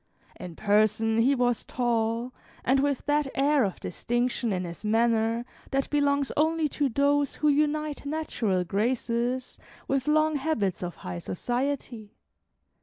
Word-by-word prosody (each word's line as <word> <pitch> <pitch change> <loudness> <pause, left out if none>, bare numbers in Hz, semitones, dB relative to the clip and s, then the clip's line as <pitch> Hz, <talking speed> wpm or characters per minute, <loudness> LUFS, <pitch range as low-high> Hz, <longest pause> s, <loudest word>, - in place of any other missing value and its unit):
In 175 -2 -9
person 215 +2 +2
he 265 +5 +4
was 245 -2 +1
tall, 235 0 -1 0.3
and 265 +2 +3
with 280 -1 0
that 295 0 +1
air 280 0 +3
of 195 -3 -2
distinction 240 +4 -1
in 185 -1 -1
his 170 +2 -8
manner 225 +1 +2 0.2
that 275 0 -1
belongs 285 -1 +2
only 315 +1 +2
to 285 0 0
those 285 +2 +1
who 300 - +2
unite 300 0 0
natural 235 - -1
graces 235 +5 -1 0.3
with 270 +1 0
long 310 0 +3
habits 245 - -1
of 175 -1 -4
high 90 -1 -4
society. 240 - -3
245 Hz, 135 wpm, -27 LUFS, 220-285 Hz, 0.3 s, he